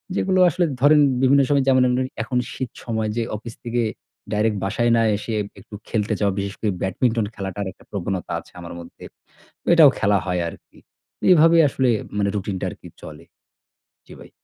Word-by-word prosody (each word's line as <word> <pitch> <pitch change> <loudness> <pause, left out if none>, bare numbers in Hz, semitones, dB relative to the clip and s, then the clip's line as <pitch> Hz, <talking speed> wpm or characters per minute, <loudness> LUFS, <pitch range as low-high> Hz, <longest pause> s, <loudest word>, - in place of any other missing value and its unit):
যেগুলো 185 -1 +1
আসলে 175 +3 0 0.2
ধরেন 150 +1 +6 0.2
বিভিন্ন 140 +1 +5
সময় 140 -2 +3
যেমন 130 -1 +5
অন্যরি 130 +1 0
এখন 125 +1 -3 0.2
শীত 130 -3 -4 0.2
সময় 110 -2 -2
যে 115 - +1
অফিস 115 +2 -8
থেকে 120 0 -1 0.5
direct 105 0 +1
বাসায় 120 +4 +1
না - - +3 0.2
এসে 110 +2 -5 0.3
একটু 105 +2 -12
খেলতে 105 -2 -1
যাওয়া, 100 -2 +1
বিশেষ 100 0 -3
করে 105 -2 0
ব্যাডমিন্টন 115 +3 0
খেলাটার 100 0 -4
একটা - - -21
প্রবণতা 95 -2 -4
আছে - - -17
আমার 85 - -8
মধ্যে। 85 - -13 0.7
এটাও 160 -4 +8
খেলা 100 -1 +3
হয় 90 -1 -1
আরকি। - - -16 0.5
এভাবে 165 0 +6
আসলে 130 -1 0 0.3
মানে 100 -1 +1
রুটিনটা 95 -1 -3
আরকি - - -12 0.2
চলে। - - -11 0.8
জি - - -14
ভাই। - - -14
115 Hz, 170 wpm, -22 LUFS, 100-130 Hz, 0.8 s, এটাও